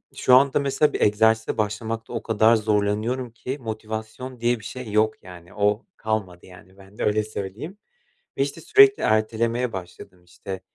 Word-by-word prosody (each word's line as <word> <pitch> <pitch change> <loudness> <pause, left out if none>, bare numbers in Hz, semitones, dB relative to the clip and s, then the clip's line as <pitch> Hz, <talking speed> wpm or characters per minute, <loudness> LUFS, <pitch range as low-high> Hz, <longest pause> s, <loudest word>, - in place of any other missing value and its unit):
şu 125 - +4
anda 135 +2 +4
mesela 140 +2 +1
bir - - -3
egzersize 110 +2 +2
başlamakta 110 +2 -3
o - - -4
kadar 110 +1 +4
zorlanıyorum 110 +3 0
ki 125 +4 -6
motivasyon 110 +3 -6
diye 120 0 +1
bir 105 - -13
şey 125 -1 -7
yok 110 +1 +1
yani. 90 -1 -13
O, 105 +3 0
kalmadı 105 -5 -3
yani 95 +1 -16
bende, 100 +1 -9
öyle 105 +1 +2
söyleyeyim 110 - -7 0.6
ve, - - +3
işte, - - -3
sürekli 410 -1 +5
ertelemeye 115 +2 0
başladım, 90 -1 -10
işte. 95 +2 -8
110 Hz, 155 wpm, -23 LUFS, 105-120 Hz, 0.6 s, sürekli